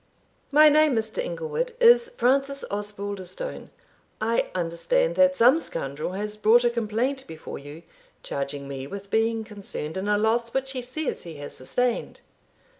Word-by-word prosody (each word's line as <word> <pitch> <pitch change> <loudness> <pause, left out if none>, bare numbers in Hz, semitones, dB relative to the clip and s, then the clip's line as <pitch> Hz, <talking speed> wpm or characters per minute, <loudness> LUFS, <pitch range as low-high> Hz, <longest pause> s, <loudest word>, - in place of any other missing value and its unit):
"My 305 +2 +8
name, 305 -2 +5
Mr. 220 - -2
Inglewood, - - -3
is 475 0 +6
Francis 275 +2 +1
Osbaldistone; 205 - -5 0.5
I 225 +2 +1
understand 185 - +1
that 275 0 +5
some 250 +7 +6
scoundrel 150 - -4
has 210 +2 -4
brought 225 +3 +5
a 240 - +3
complaint 235 +4 -1
before 160 -1 -8
you, 145 +4 -11 0.4
charging 140 0 -4
me 135 -1 -6
with 200 +4 -8
being 225 0 +1
concerned 200 -7 -6
in 190 +2 -3
a 210 0 +3
loss 230 +3 0
which 270 0 -1
he 260 -2 -3
says 260 +5 -4
he 165 -2 -9
has 145 0 -8
sustained." 240 - -2
225 Hz, 150 wpm, -25 LUFS, 190-275 Hz, 0.5 s, My